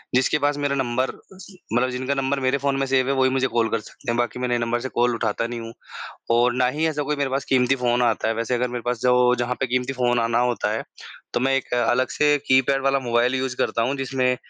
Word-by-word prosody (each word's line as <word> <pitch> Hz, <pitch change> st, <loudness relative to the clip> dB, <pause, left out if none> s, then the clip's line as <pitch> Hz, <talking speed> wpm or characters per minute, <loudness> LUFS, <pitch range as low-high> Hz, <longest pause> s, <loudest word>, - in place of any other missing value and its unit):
जिसके 130 Hz, +4 st, +3 dB
पास 145 Hz, 0 st, +1 dB
मेरा 145 Hz, -1 st, -1 dB
नंबर 130 Hz, -1 st, 0 dB
अ, -, -, -10 dB, 0.2 s
जी 190 Hz, 0 st, -14 dB, 0.2 s
मतलब 125 Hz, +2 st, +2 dB
जिनका 130 Hz, +2 st, -2 dB
नंबर 135 Hz, 0 st, -1 dB
मेरे 130 Hz, +1 st, +1 dB
फ़ोन 140 Hz, 0 st, -1 dB
में 135 Hz, -, +1 dB
सेव 130 Hz, -1 st, +2 dB
है, -, -, +2 dB
वही 130 Hz, -1 st, +3 dB
मुझे 130 Hz, 0 st, +1 dB
कॉल 115 Hz, -2 st, 0 dB
कर 115 Hz, -, 0 dB
सकते 120 Hz, +4 st, -7 dB
हैं। 120 Hz, -, -1 dB
बाकी 120 Hz, +1 st, -1 dB
मैं 125 Hz, -, -1 dB
नए 120 Hz, 0 st, +1 dB
नंबर 120 Hz, 0 st, -1 dB
से 130 Hz, +2 st, -5 dB
कॉल 120 Hz, 0 st, +3 dB
उठाता 115 Hz, 0 st, -1 dB
नहीं 120 Hz, 0 st, -5 dB
हूँ 115 Hz, 0 st, -8 dB, 0.6 s
और 120 Hz, +1 st, +3 dB
ना -, -, +4 dB
ही 160 Hz, -, +2 dB
ऐसा 150 Hz, -2 st, -2 dB
कोई 150 Hz, +1 st, -2 dB
मेरे 140 Hz, -2 st, -1 dB
पास 135 Hz, +1 st, -1 dB
कीमती 130 Hz, 0 st, +3 dB
फ़ोन 125 Hz, -1 st, +1 dB
आता 120 Hz, -2 st, +1 dB
है, 115 Hz, -, 0 dB
वैसे 115 Hz, +2 st, -2 dB
अगर 125 Hz, +1 st, 0 dB
मेरे 120 Hz, -1 st, -5 dB
पास 125 Hz, -2 st, -3 dB
जो 125 Hz, 0 st, +4 dB
जहाँ 120 Hz, +1 st, -1 dB
पे 135 Hz, -, +1 dB
क़ीमती 125 Hz, +1 st, -1 dB
फ़ोन 120 Hz, -2 st, +1 dB
आना 115 Hz, 0 st, +1 dB
होता -, -, -2 dB
है -, -, -2 dB, 0.5 s
तो -, -, +1 dB
मैं 135 Hz, +2 st, +2 dB
एक 135 Hz, -, -4 dB
अलग 130 Hz, +1 st, +1 dB
से 150 Hz, 0 st, +3 dB
कीपैड 130 Hz, +1 st, +3 dB
वाला 135 Hz, 0 st, +2 dB
मोबाइल 120 Hz, 0 st, +1 dB
यूज़ 130 Hz, -1 st, -2 dB
करता 115 Hz, -, 0 dB
हूँ 130 Hz, +4 st, -1 dB
जिसमें 130 Hz, -1 st, 0 dB
125 Hz, 265 wpm, -23 LUFS, 120-135 Hz, 0.6 s, ना